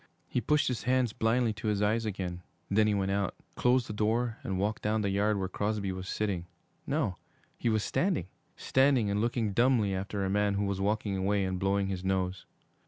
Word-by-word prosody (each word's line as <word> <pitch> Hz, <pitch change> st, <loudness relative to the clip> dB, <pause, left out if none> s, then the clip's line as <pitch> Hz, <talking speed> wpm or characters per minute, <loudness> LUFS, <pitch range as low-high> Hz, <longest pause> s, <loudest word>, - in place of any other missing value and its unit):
He 125 Hz, -, -1 dB
pushed 150 Hz, +1 st, +2 dB
his 125 Hz, -3 st, -1 dB
hands 125 Hz, -2 st, +1 dB
blindly 115 Hz, 0 st, +1 dB
to 110 Hz, +1 st, -5 dB
his 105 Hz, -2 st, +1 dB
eyes 110 Hz, +2 st, +1 dB
again; 90 Hz, -3 st, -4 dB, 0.3 s
then 105 Hz, +2 st, +4 dB
he 105 Hz, -, +2 dB
went 95 Hz, -1 st, 0 dB
out, 100 Hz, -1 st, 0 dB, 0.2 s
closed 125 Hz, 0 st, +2 dB
the -, -, -6 dB
door, 110 Hz, +2 st, 0 dB
and 95 Hz, -, -2 dB
walked 105 Hz, +3 st, -1 dB
down 110 Hz, +1 st, +1 dB
the 100 Hz, -2 st, 0 dB
yard 105 Hz, +2 st, +2 dB
where 95 Hz, -1 st, -1 dB
Crosby 105 Hz, +1 st, -2 dB
was 95 Hz, 0 st, -6 dB
sitting 95 Hz, -5 st, -2 dB, 0.4 s
no, -, -, 0 dB, 0.4 s
he 120 Hz, -, -1 dB
was 110 Hz, -1 st, +1 dB
standing, 185 Hz, -2 st, 0 dB, 0.3 s
standing 130 Hz, -6 st, +3 dB
and 100 Hz, +1 st, +1 dB
looking 115 Hz, -3 st, 0 dB
dumbly 120 Hz, -4 st, +3 dB
after 100 Hz, +1 st, -2 dB
a -, -, 0 dB
man 100 Hz, 0 st, +2 dB
who 100 Hz, +1 st, 0 dB
was 100 Hz, -1 st, -2 dB
walking 105 Hz, -1 st, 0 dB
away 100 Hz, +1 st, +1 dB
and 95 Hz, -1 st, -2 dB
blowing 100 Hz, +1 st, +1 dB
his 95 Hz, -1 st, -3 dB
nose. 95 Hz, -1 st, -1 dB
105 Hz, 205 wpm, -30 LUFS, 95-115 Hz, 0.4 s, then